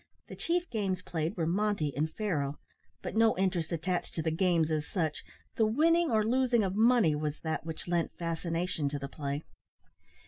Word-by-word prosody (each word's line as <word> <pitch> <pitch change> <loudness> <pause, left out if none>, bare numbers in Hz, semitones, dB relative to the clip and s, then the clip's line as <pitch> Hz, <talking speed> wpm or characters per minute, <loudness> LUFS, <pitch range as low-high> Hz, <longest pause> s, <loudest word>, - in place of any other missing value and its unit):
The - - -7
chief 350 +1 0
games 195 -5 -1
played 160 0 -2
were 165 - +1
monte 180 -4 0
and 155 +2 0
faro, 150 -10 -2 0.5
but - - -4
no 225 -2 +4
interest 185 -4 0
attached 175 +2 -2
to 160 - -1
the 160 - +1
games 165 -2 +2
as 155 -1 -1
such, 160 -5 -2 0.3
the 220 - +4
winning 330 +8 +3
or 220 -3 +3
losing 245 -1 +3
of 190 -1 -1
money 225 -6 +5
was 150 0 -2
that 160 0 -3
which 160 +1 -6
lent 170 -1 -1
fascination 165 -2 -1
to 145 - -3
the 140 0 -5
play. 140 +1 -4
175 Hz, 180 wpm, -31 LUFS, 155-215 Hz, 0.5 s, money